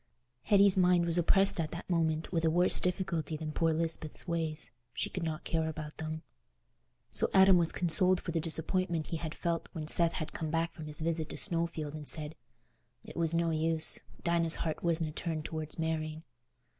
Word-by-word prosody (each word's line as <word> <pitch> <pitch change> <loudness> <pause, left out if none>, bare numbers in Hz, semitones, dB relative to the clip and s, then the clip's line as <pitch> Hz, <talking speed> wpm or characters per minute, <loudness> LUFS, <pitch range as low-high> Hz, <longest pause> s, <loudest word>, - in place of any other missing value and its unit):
Hetty's 200 -1 +5
mind 180 -2 +3
was 170 +1 +1
oppressed 195 +2 +3
at 160 -2 -1
that 170 - -7
moment 160 -2 0
with 165 -3 0
a 160 - +3
worse 175 +3 +5
difficulty 170 -4 -2
than 155 0 -5
poor 165 +1 +1
Lisbeth's 160 0 -1
ways; 160 -2 -3 0.2
she - - -2
could 185 - -4
not 160 -2 -3
care 160 -1 -1
about 155 -1 -7
them. 155 0 -5 0.9
So - - +2
Adam 190 -1 +7
was 165 -1 +1
consoled 180 +2 +3
for 170 - -5
the 165 - 0
disappointment 165 +1 0
he 165 - -2
had 160 -1 -6
felt 170 -1 -2
when 160 -3 -5
Seth 170 +1 +5
had 155 - -5
come 160 - -4
back 165 +1 -1
from 155 -2 -9
his 150 +1 -4
visit 160 -1 -1
to - - -7
Snowfield 165 -5 -1
and 150 -2 -7
said 155 -1 +1 0.7
"it - - -12
was 165 -1 0
no 170 0 +1
use—Dinah's 165 +1 0
heart 160 - -3
wasna 165 -2 0
turned 160 -1 -4
towards 155 -1 -5
marrying." 160 -1 -3
165 Hz, 185 wpm, -31 LUFS, 155-170 Hz, 0.9 s, Adam